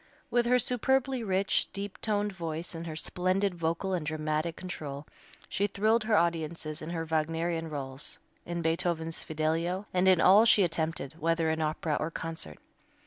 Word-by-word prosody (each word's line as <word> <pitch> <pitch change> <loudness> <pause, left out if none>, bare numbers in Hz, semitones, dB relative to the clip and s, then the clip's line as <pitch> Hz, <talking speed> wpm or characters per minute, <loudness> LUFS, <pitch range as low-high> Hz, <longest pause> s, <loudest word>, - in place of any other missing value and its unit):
With 240 -1 +3
her 250 +1 +5
superbly 260 +1 +1
rich, 195 -1 +1
deep 200 -1 -5
toned 205 -1 0
voice 165 -1 -4
and 165 0 -6
her 160 - -5
splendid 185 +4 0
vocal 170 +3 -1
and 175 -4 -1
dramatic 155 +1 -1
control 150 -6 -6 0.4
she 200 - 0
thrilled 215 +3 +2
her 215 -1 +3
audiences 165 -2 -1
in 155 - -6
her 165 -1 -3
Wagnerian 165 +1 -1
rôles, 135 -2 -4 0.3
in 170 0 -4
Beethoven's 165 0 0
"Fidelio," 165 +5 -1
and 185 +1 +3
in 185 -2 +6
all 195 +6 +7
she 220 -3 +6
attempted, 160 -3 -1
whether 165 0 +2
in 160 0 -1
opera 155 0 0
or 155 - -1
concert. 160 - -5
165 Hz, 160 wpm, -30 LUFS, 160-190 Hz, 0.4 s, all